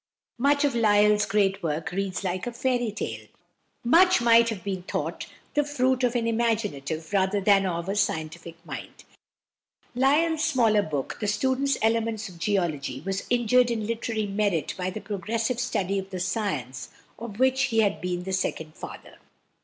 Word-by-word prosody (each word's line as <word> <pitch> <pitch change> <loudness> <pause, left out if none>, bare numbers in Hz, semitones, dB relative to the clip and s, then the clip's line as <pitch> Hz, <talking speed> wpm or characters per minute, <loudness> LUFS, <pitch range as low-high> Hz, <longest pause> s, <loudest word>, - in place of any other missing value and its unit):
Much 285 +3 +3
of 285 - +1
Lyell's 210 -2 +4
great 195 -1 +1
work 160 0 -2
reads 195 +1 -3
like 185 +3 -2
a - - -2
fairy 245 -1 0
tale; 210 - -5 0.6
much 360 +8 +5
might 235 -1 +5
have 205 -6 -5
been 190 -2 -3
thought 180 - -4 0.3
the 295 - +2
fruit 260 -3 0
of 245 0 +1
an 235 -1 +1
imaginative 210 -9 -1
rather 195 +1 +2
than 195 -1 +4
of 170 -1 -3
a 195 - -1
scientific 165 -3 -2
mind. - - -8 0.9
Lyell's 300 +5 +2
smaller 230 -9 +3
book, 145 -7 -4
the 210 - -2
"Student's 260 +6 +1
Elements 225 -1 0
of 175 -2 -14
Geology," 165 -8 -1
was 195 +3 -4
injured 245 +1 +3
in 225 -3 -2
literary 225 -1 -2
merit 200 -5 0
by 185 0 -2
the 210 +3 -6
progressive 220 +4 -2
study 195 -6 -1
of 190 0 -7
the 185 - -5
science 145 - -3 0.3
of 225 -3 -7
which 260 +2 +3
he 225 -1 +2
had 205 -2 0
been 180 0 -2
the 190 +1 -4
second 160 -4 -2
father. - - -10
210 Hz, 165 wpm, -26 LUFS, 185-240 Hz, 0.9 s, much